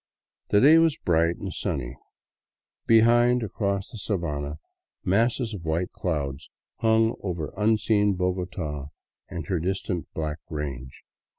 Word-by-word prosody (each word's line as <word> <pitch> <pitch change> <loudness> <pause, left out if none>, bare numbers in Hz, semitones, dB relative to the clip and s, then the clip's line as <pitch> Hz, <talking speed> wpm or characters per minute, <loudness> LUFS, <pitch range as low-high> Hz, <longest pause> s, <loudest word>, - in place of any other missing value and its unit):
The 100 - +5
day 155 +4 +8
was 165 -2 +3
bright 85 0 +2
and 95 -2 -6
sunny. 70 -10 -3 0.9
Behind, 120 +2 +5
across 100 -1 -2
the 115 - -8
sabana, 75 -8 -2 0.5
masses 115 +4 +1
of 95 -5 -7
white 80 +3 -1
clouds 70 -6 -3 0.3
hung 110 0 +3
over 85 -5 -4
unseen 105 -1 +2
Bogota 90 -5 -3 0.4
and 85 -3 -5
her 90 +2 -1
distant 90 0 -2
black 75 -1 -3
range. 70 -5 -6
90 Hz, 120 wpm, -26 LUFS, 80-110 Hz, 0.9 s, day